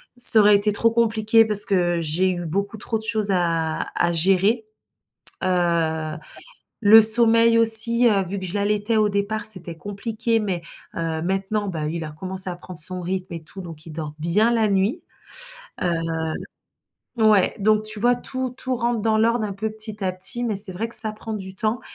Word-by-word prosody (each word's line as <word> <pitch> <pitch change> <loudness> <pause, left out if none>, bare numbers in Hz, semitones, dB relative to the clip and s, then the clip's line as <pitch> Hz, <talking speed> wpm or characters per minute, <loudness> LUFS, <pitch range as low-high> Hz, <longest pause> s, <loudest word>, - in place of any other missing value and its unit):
ça 245 -2 +10
aurait 205 0 +4
été 205 +1 0
trop 230 +3 +2
compliqué, 225 -1 +1
parce 210 -2 +4
que 175 -3 -1
j'ai 165 +4 0
eu 175 -1 -5
beaucoup 200 +6 -4
trop 225 0 -4
de - - -8
choses 220 -2 -2
à 165 -3 -2
à 175 - 0
gérer. 195 +6 0 0.8
Heu, 170 -3 -2 0.6
le 220 +1 +7
sommeil 230 +1 +6
aussi, 230 +1 +6
heu, 205 -4 +1
vu 190 +2 -6
que 190 - -7
je 180 - -6
l'allaitais 210 +2 -2
au 215 -1 +1
départ, 200 +2 -4
c'était 180 -5 -2
compliqué 220 +5 -4
mais, 190 -5 -4 0.3
heu, 165 -1 -4
maintenant 195 +3 -3
bah, 160 -5 -5
il 165 +1 -5
a 155 - -8
commencé 185 +4 -1
à 175 - -6
prendre 180 0 -13
son 180 +4 0
rythme 185 0 -6
et 165 -1 -9
tout, 190 +4 -12
donc 165 -3 -12
il - - -10
dort 155 -1 -8
bien 195 +9 0
la 225 -2 0
nuit. 195 +3 -2 0.8
Heu, 175 - -1 1.3
ouais, 215 -4 +2
donc 215 +1 +1
tu 215 0 -5
vois 240 +3 +1
tout 260 +1 -6
tout 255 -1 -4
rentre 235 -1 -3
dans 220 0 -1
l'ordre 230 +1 0
un 205 - -5
peu, 215 +3 -5
petit 215 -1 -8
à 185 - -2
petit, 235 +7 -2
mais 225 -3 -3
c'est 200 0 +5
vrai 205 +6 -5
que 230 - +1
ça 220 0 +8
prend 220 +1 -9
du 190 -2 -9
temps, 220 +4 -3
205 Hz, 195 wpm, -20 LUFS, 180-220 Hz, 1.3 s, ça